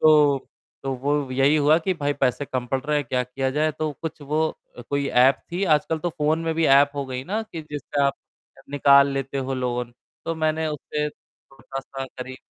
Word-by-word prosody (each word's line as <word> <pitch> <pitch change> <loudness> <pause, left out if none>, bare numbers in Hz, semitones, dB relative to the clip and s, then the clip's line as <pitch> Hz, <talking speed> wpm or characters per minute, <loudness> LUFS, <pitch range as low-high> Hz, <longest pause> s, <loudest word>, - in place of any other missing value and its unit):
तो 150 -3 +5 0.3
तो 135 -1 -2
वो 140 +1 -1
यही 135 +3 +3
हुआ 150 +1 +5
कि 185 +3 0
भाई 145 -3 -1
पैसे 135 0 0
कम 130 -2 -3
पड़ 130 +2 -1
रहे 150 0 +1
हैं, 145 - 0
क्या 125 +1 0
किया 130 +2 -2
जाए? 155 +2 +1
तो 155 0 -3
कुछ 160 0 -5
वो 155 +3 +1 0.3
अ, - - -8
कोई 140 +3 -1
ऐप 130 +2 +5 0.2
थी, 180 +3 -1
आजकल 155 -1 +2
तो 175 - -2
फ़ोन 155 -1 +1
में 165 - 0
भी 165 - +1
ऐप 140 +1 +6
हो 140 -1 -2
गई 130 0 -4
ना 210 +8 -2
कि 165 -7 -8
जिससे 145 0 -3
आप 140 0 +2 0.6
निकाल 140 0 +6
लेते 135 0 -3
हो 135 0 -2
लोन। 125 -1 -2 0.3
तो 165 - -2
मैंने 160 0 0
उससे 150 0 -3
थोड़ा-सा 135 -1 -9
करीब, 130 0 -8
145 Hz, 205 wpm, -24 LUFS, 135-155 Hz, 0.6 s, ऐप